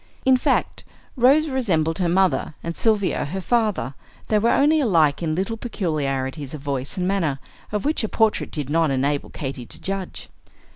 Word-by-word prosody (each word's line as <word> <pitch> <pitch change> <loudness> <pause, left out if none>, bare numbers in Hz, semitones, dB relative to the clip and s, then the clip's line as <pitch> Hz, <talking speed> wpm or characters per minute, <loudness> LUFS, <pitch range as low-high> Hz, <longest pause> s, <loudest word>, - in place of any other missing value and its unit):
In 260 0 +6
fact, 250 - 0 0.3
Rose 275 +5 +4
resembled 180 - 0
her 175 -2 +1
mother, 185 -3 +1
and 170 0 -4
Sylvia 210 -8 +1
her 185 +7 -4
father; 210 - 0 0.4
they 215 - +3
were 230 +3 +2
only 305 +5 +4
alike 165 - +3
in 155 -2 -1
little 195 +6 -2
peculiarities 150 - -3
of 150 - -9
voice 140 0 -3
and 180 0 0
manner, 170 -8 0 0.3
of 210 -1 -2
which 300 -4 +1
a 220 - -1
portrait 220 -1 +1
did 150 -5 -4
not 160 +1 +2
enable 140 +2 0
Katy 130 -4 -6
to - - -6
judge. 195 -1 -5
180 Hz, 175 wpm, -23 LUFS, 145-220 Hz, 0.4 s, In